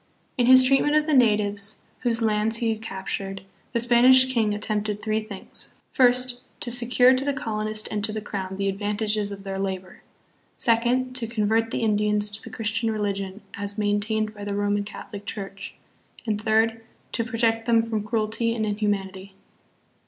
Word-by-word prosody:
In 245 -1 +2
his 255 0 +9
treat 270 +1 +4
ment 295 0 +1
of 305 0 +3
the 310 - 0
natives, 210 -4 +2 0.2
whose 235 -2 0
lands 220 +1 +2
he 230 -1 0
captured, 195 -2 -5 0.3
the 235 - 0
Span 240 0 +3
ish 260 0 +6
king 220 -4 +2
attempted 210 0 -2
three 215 0 -1
things, 210 -3 -8 0.2
first, 250 -1 +2 0.2
to 240 - -3
secure 245 +1 +4
to 260 +1 +1
the 285 0 0
colonist 215 -3 -2
and 210 -1 -2
to 220 - -1
the 215 - -3
crown 190 -2 -5
the 195 0 -1
advantages 210 +1 -1
of 195 -1 -8
their 195 -1 -4
labor, 190 -1 -4 0.6
second, 245 +2 +1
to 235 -3 -3
convert 225 0 +1
the 230 - -2
Indians 210 -1 +1
to 210 +1 -1
the - - -9
Christian 225 +1 -1
religion 200 -2 -3
as 200 +1 -4
maintained 215 +1 0
by 205 -1 -9
the 205 0 -3
Roman 205 0 0
Catholic 205 0 -9
Church, 195 -1 -7 0.5
and 210 -2 -1
third, 225 +1 +2 0.3
to 230 - 0
protect 225 -1 0
them 230 -1 +4
from 225 -2 -2
cruelty 220 +2 -1
and 220 -2 -1
inhumanity. 200 -2 -2
215 Hz, 175 wpm, -25 LUFS, 205-230 Hz, 0.6 s, his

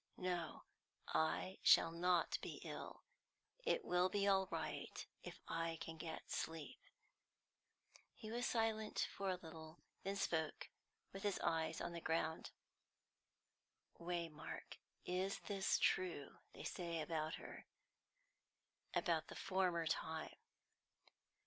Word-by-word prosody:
"No, 175 -3 -1 0.5
I 80 +4 +1
shall 165 - +8
not 175 +1 +3
be - - -4
ill. - - -6 0.6
It 485 -2 +2
will 180 +1 +4
be 200 +1 +2
all 190 -1 +5
right - - -3 0.2
if - - -7
I 165 0 0
can 165 - -5
get 160 0 -5
sleep." 160 -2 -3 1.4
He 215 -1 -7
was 240 +1 +1
silent 220 -2 +2
for 195 -1 0
a 185 - +2
little, 160 -2 -9 0.2
then 195 +1 -1
spoke, 160 -5 0 0.4
with 195 - -5
his 205 -2 +1
eyes 160 0 +2
on 175 - -2
the 170 - -4
ground. 160 0 0 1.5
"Waymark, 170 -3 -4 0.3
is 185 +2 +1
this 195 -2 +2
true 175 -6 +1
they - - -8
say 170 -2 -2
about 155 0 0
her - - -8 1.3
about 165 -5 +2
the - - -8
former 185 -3 +2
time?" 160 0 -1
170 Hz, 115 wpm, -42 LUFS, 160-190 Hz, 1.5 s, shall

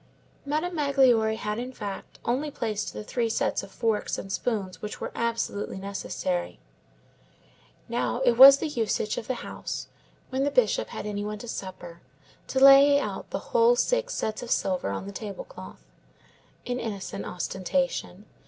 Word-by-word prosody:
Madame 310 +5 -1
Magloire 265 -8 +3
had, 210 0 -3
in 250 +1 -5
fact, 205 -6 -7
only 265 +6 0
placed 215 -6 -3
the 105 0 -7
three 230 - -1
sets - - 0
of - - -10
forks 220 +1 -1
and 195 - -6
spoons 195 -5 -2
which 210 - -6
were - - -4
absolutely 230 -4 -2
necessary. 190 -2 -3 1.3
Now, 240 0 -1
it 245 - +6
was 270 +4 +10
the 320 - -2
usage 225 -6 -1
of 220 - -10
the 255 - -1
house, - - -6 0.4
when 265 +1 0
the 285 - +2
Bishop - - +2
had - - -7
any 205 -1 -3
one 210 0 -4
to 240 - -9
supper, 175 -5 -7 0.5
to 265 - 0
lay 275 +1 +8
out - - -5
the - - -6
whole 475 0 +5
six - - 0
sets 215 -1 -2
of 245 - -7
silver 185 - 0
on 100 - -4
the 200 - -6
table 200 -1 -6
cloth—an 250 - -11
innocent 205 -5 -5
ostentation. 190 +2 -2
230 Hz, 160 wpm, -27 LUFS, 200-275 Hz, 1.3 s, was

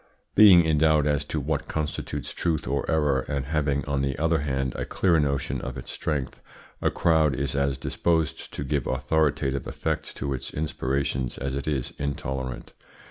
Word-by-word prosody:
Being 95 -5 +8
in 80 -2 +2
doubt 80 -1 +4
as 75 -1 +1
to 75 - -2
what 75 +1 -2
constitutes 75 -1 -3
truth 80 -6 -1
or 70 +2 -1
error, 75 -4 +2
and 70 -2 -2
having, 70 -2 0
on 70 -1 0
the 70 -1 -1
other 80 +2 +2
hand, 65 -3 -1
a - - -3
clear 85 -4 +2
notion 70 -3 -1
of 65 0 -5
its 60 - -7
strength, 70 -5 -3 0.4
a - - +3
crowd 80 -4 +3
is 70 +3 -2
as 70 -1 0
disposed 80 -3 -1
to - - -3
give 70 -2 -1
authoritative 70 -3 0
effect - - -3
to 70 +1 -2
its 65 - -5
inspirations 70 -4 -1
as 70 -1 -3
it 70 +1 -4
is 70 -5 -1
intolerant. 65 -3 -4
70 Hz, 175 wpm, -26 LUFS, 65-80 Hz, 0.4 s, Being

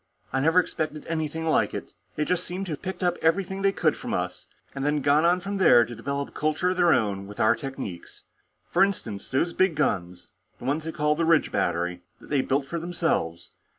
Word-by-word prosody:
I 135 - +2
never 165 +6 +4
expected 155 -3 -3
anything 160 0 -3
like 160 - +2
it. - - -7 0.2
They 150 - 0
just 180 +1 0
seem 185 +2 -4
to 180 - -6
have 150 - -5
picked 190 0 -5
up 175 -1 +1
everything 190 +4 +1
they 195 0 +3
could - - +1
from - - -4
us, - - -4 0.3
and 135 - -4
then 145 0 +1
gone 145 +3 +4
on 175 +1 +4
from 200 +2 -3
there 120 -11 +6
to 120 - -8
develop 140 +5 -3
a - - -21
culture 155 +4 0
of 185 - -3
their 175 -2 +5
own 100 -7 +1
with 105 - -11
our 110 - +4
techniques. 135 - -7 0.5
For - - +5
instance, 115 - -2
those 170 +6 0
big 185 -3 +2
guns, 90 -11 -2 0.3
the 120 - -10
ones 150 +4 -1
they 165 - -3
call 150 -2 +1
the 165 +2 -1
Ridge 165 -2 +3
Battery, 90 +1 -1 0.2
that - - -15
they 140 -3 +3
built 135 +1 0
for 170 +5 -4
themselves. 165 - -2
150 Hz, 220 wpm, -26 LUFS, 130-175 Hz, 0.5 s, there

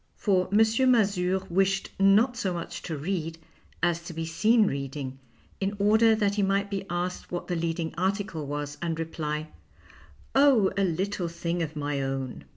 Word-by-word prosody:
For 185 -3 +1
M. 205 - +3 0.3
Mazure 190 -5 +2
wished 195 +2 +1
not 210 +6 +5
so 190 -5 -2
much 170 - -6
to 160 -3 -4
read 165 +1 -3 0.5
as 170 -1 +2
to 170 - -7
be 165 0 -3
seen 215 +7 +3
reading, 135 -3 -4 0.4
in 195 +1 -1
order 220 +2 +4
that 205 -2 +1
he 205 - 0
might 200 +1 +1
be 195 -1 -3
asked 175 +1 -3
what 175 - -4
the 180 - -1
leading 165 -1 -2
article 190 -5 -1
was 145 0 -4
and 165 -1 -2
reply, 155 -1 -3 0.4
" - - -25
Oh, 270 -8 +5
a 200 - +1
little 185 +1 -1
thing 170 +1 -3
of 155 -1 -3
my 145 -1 -2
own." 135 - -4
180 Hz, 170 wpm, -27 LUFS, 160-200 Hz, 0.5 s, not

